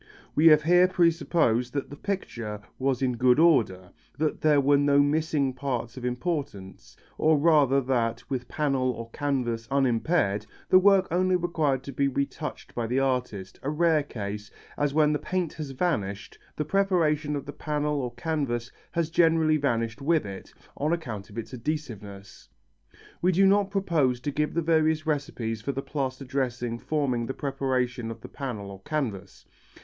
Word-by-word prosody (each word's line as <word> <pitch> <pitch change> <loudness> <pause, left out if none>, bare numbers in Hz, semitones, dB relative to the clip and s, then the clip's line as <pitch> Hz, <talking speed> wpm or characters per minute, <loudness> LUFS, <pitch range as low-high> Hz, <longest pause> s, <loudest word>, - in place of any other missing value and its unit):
We 160 +2 +5
have 150 -1 +7
here 180 +3 +5
presupposed 165 -9 +2
that 140 -1 -3
the - - -6
picture 120 - -4 0.2
was 135 -1 0
in 125 -2 0
good 125 +1 +4
order, 110 - +3 0.3
that 155 0 -1
there 150 -2 +4
were 140 +1 +4
no 140 0 +4
missing 145 -2 +1
parts 125 -4 -3
of 130 - -8
importance, 125 - -4 0.2
or 155 0 +4
rather 145 -3 +4
that, 120 -3 -1
with 130 -3 -3
panel 135 -4 0
or 115 -1 -8
canvas 125 -6 -2
unimpaired, 120 - +1 0.2
the 185 - +7
work 195 0 +5
only 185 +1 +2
required 155 -7 0
to 140 - -7
be 140 +1 +1
retouched 140 +3 -4
by 120 -1 -2
the 125 +3 -1
artist, 125 -8 -2
a 135 - -3
rare 160 0 +3
case, 105 -6 -6 0.3
as 145 -1 0
when 150 0 +3
the 150 - 0
paint 185 -3 -2
has 150 -3 -6
vanished 110 - -2 0.2
the 150 - -2
preparation 160 -5 +1
of 140 - -4
the 145 - -7
panel 150 -1 -1
or 125 -2 -3
canvas 135 -7 -2 0.2
has 170 -2 -1
generally 160 -2 +4
vanished 115 -4 -1
with 155 0 +2
it, 95 -1 -8 0.3
on 150 +3 0
account 120 -12 -5
of 105 - -12
its 115 0 -6
adhesiveness. 115 -8 -6 0.7
We 180 - +3
do 190 +2 +4
not 200 0 +4
propose 165 -11 +1
to 145 - -2
give 150 +2 -1
the 170 - +1
various 160 -1 +2
recipes 125 -7 -2
for 140 +5 -3
the 135 - -4
plaster 135 -2 -3
dressing 125 -3 -2
forming 130 -6 -1
the 135 - -4
preparation 130 -4 -2
of 115 0 -8
the - - -10
panel 110 -8 -5
or 95 -1 -11
canvas. 115 -11 -4
140 Hz, 170 wpm, -27 LUFS, 120-155 Hz, 0.7 s, have